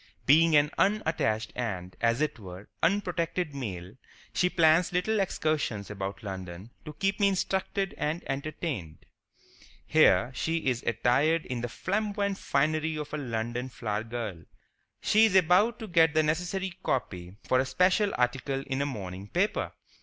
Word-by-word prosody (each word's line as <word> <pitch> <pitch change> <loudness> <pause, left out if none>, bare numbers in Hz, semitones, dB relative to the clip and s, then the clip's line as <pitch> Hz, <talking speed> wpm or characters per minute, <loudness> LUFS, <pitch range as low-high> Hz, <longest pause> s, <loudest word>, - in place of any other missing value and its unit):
Being 160 +3 +5
an 145 0 +4
unattached 160 - +1
and, 95 -7 -4
as 115 +3 +2
it 155 -5 -1
were, 95 0 -10
unprotected 175 -3 0
male, 100 -7 -6 0.4
she 180 - +2
plans 165 0 +4
little 195 +5 +1
excursions 150 - -1
about 100 0 -5
London 95 +1 -7
to 150 - -7
keep 195 +5 -1
me 200 - +5
instructed 195 0 -1
and 160 +3 -1
entertained. 135 - -4 0.8
Here 95 +8 +4
she 165 +6 -1
is 125 -2 +1
attired 140 +8 +2
in 125 -2 -4
the 120 - -3
flamboyant 200 - -2
finery 155 +3 0
of 150 0 -6
a - - -1
London 120 0 -3
flowergirl. 110 -5 -4 0.6
She 220 +1 +5
is 205 -4 +1
about 190 +6 +4
to 220 - -7
get 165 -4 +4
the 155 - +4
necessary 180 +4 -1
copy 90 - -3
for 130 - +2
a 130 - +1
special 190 +6 +2
article 135 +2 0
in 135 +1 -2
a 140 - 0
morning 95 -6 -6
paper. 185 - 0
145 Hz, 145 wpm, -28 LUFS, 115-180 Hz, 0.8 s, Being